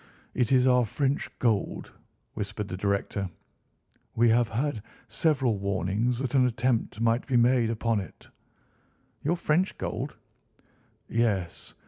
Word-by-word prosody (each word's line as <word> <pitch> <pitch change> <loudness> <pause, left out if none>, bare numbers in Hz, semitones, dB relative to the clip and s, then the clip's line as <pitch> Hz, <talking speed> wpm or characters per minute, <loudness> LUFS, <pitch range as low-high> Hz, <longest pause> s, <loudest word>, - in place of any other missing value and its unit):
"It 125 -1 0
is 130 -1 +5
our 125 -1 +5
French 135 +5 -1
gold," 110 -5 0 0.4
whispered 105 0 -4
the 90 - -3
director. 100 0 -1 0.9
"We 120 +1 +4
have 115 0 +3
had 120 0 -1 0.3
several 130 -3 +1
warnings 100 +5 0
that 130 0 -3
an 130 -2 +5
attempt 120 -2 0
might 115 +1 +1
be 130 -3 +2
made 120 -1 +4
upon 115 -1 0
it." 95 -5 -10 1.0
"Your 170 +5 +1
French 170 +3 +1
gold?" - - -4 0.9
"Yes. 105 -7 -1
115 Hz, 125 wpm, -27 LUFS, 105-130 Hz, 1.0 s, is